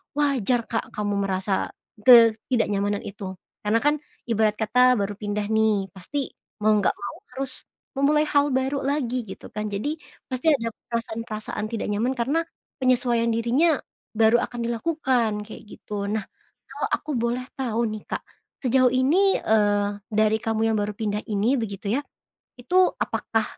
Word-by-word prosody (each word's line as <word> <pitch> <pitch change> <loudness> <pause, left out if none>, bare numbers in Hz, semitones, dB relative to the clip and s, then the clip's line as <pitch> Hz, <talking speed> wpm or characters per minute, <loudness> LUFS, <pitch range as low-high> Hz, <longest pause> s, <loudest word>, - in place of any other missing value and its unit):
wajar 255 -5 +1
Kak 225 - -1
kamu 205 -1 -1
merasa 190 +1 0 0.4
ketidaknyamanan 220 -3 +5
itu. 195 -2 -7 0.2
Karena 215 +2 +1
kan, 295 +1 +3 0.2
ibarat 220 -2 +1
kata 250 +4 +4
baru 205 -1 -2
pindah 205 0 -2
nih, 215 -4 +2
pasti 250 +9 -4 0.3
mau 215 - +5
nggak 195 - +1
mau 240 - -6 0.2
harus 270 -1 -3 0.5
memulai 300 +2 +3
hal 285 -2 +3
baru 265 +2 +1
lagi 255 -4 -1
gitu 190 - -10
kan 210 0 -4
jadi, 210 +9 -1 0.4
pasti 260 +5 +2
ada 230 -4 -1 0.2
perasaan-perasaan 220 -2 -4
tidak 225 0 -3
nyaman 225 +6 0
karena 280 +7 0 0.3
penyesuaian 245 -2 +2
dirinya 255 +7 +2 0.3
baru 220 +2 +5
akan 240 -1 -9
dilakukan, 245 -3 +1
kayak 210 +1 -10
gitu. 205 -1 -6
Nah, 210 +2 -1 0.5
kalau - - -3
aku 310 - -1
boleh 235 +2 0 0.2
tahu 235 -3 0
nih 215 -1 -6
Kak, - - -4 0.4
sejauh 255 -1 +3
ini, 330 +10 +3
eee, 205 -1 +2 0.2
dari 215 +1 +3
kamu 225 0 -2
yang 220 - +1
baru 205 0 -1
pindah 210 0 -3
ini, 220 +6 +1
begitu 200 -3 -4
ya, 285 - -4 0.5
itu 255 +9 -2 0.2
apakah 225 -1 -1
230 Hz, 150 wpm, -24 LUFS, 210-255 Hz, 0.5 s, ketidaknyamanan